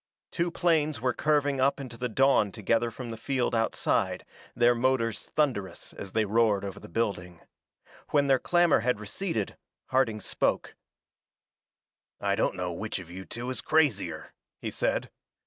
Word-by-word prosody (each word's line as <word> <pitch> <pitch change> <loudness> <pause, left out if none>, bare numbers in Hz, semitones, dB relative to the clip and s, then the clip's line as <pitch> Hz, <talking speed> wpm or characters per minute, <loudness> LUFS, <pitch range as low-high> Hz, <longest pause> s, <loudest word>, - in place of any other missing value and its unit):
Two 175 0 0
planes 160 -5 +1
were 125 +1 +1
curving 145 -2 +1
up 140 +2 +2
into 130 -4 -7
the 125 +1 -3
dawn 130 -3 +3
together 115 +3 +1
from 120 +1 -7
the 115 - -6
field 125 +1 -1
outside, 115 -1 0 0.3
their 120 +1 +5
motors 120 -2 0
thunderous 125 -11 -1
as 95 - -8
they 110 -1 +2
roared 105 -1 +2
over 100 - -6
the - - -12
building. 90 -4 -2 0.7
When 145 -1 +3
their 135 -2 +4
clamor 175 -2 +4
had 125 -3 0
receded, 110 - -3 0.3
Harding 130 -5 +2
spoke: - - -1 1.5
"I - - +1
don't - - +1
know - - -3
which - - -4
of 85 -2 -9
you 95 +1 -8
two 120 +2 -4
is 130 - -3
crazier," 100 - +1 0.2
he - - -5
said. - - -1
120 Hz, 155 wpm, -28 LUFS, 105-140 Hz, 1.5 s, their